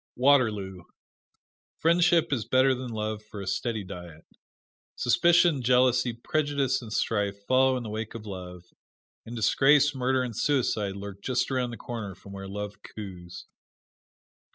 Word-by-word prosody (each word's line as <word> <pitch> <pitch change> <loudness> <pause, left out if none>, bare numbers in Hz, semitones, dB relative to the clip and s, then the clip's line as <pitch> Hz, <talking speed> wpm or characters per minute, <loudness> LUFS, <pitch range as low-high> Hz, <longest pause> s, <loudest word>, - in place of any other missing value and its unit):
Waterloo: 110 -9 +2 0.9
Friendship 170 -1 +3
is 120 -5 0
better 130 +1 +4
than 130 -1 -5
love 110 -1 -3
for 105 -1 -10
a 100 - -6
steady 110 +3 -2
diet. 90 -3 -10 0.7
Suspicion, 170 +4 +3
jealousy, 125 0 +3
prejudice 140 +2 -1
and 115 -3 -10
strife 100 -2 -1
follow 130 +1 +3
in 125 - -5
the 110 - -6
wake 110 +1 -5
of 110 -2 -8
love; 90 -3 -8 0.6
and 120 - -7
disgrace, 140 +5 +4
murder 130 0 +1
and 120 -3 -5
suicide 110 -7 0
lurk 100 0 -8
just 130 +3 -1
around 130 -2 0
the 115 - -7
corner 110 -6 -6
from 100 - -14
where 95 0 -7
love 105 +1 -6
coos. 90 -5 -9
115 Hz, 145 wpm, -27 LUFS, 100-130 Hz, 0.9 s, better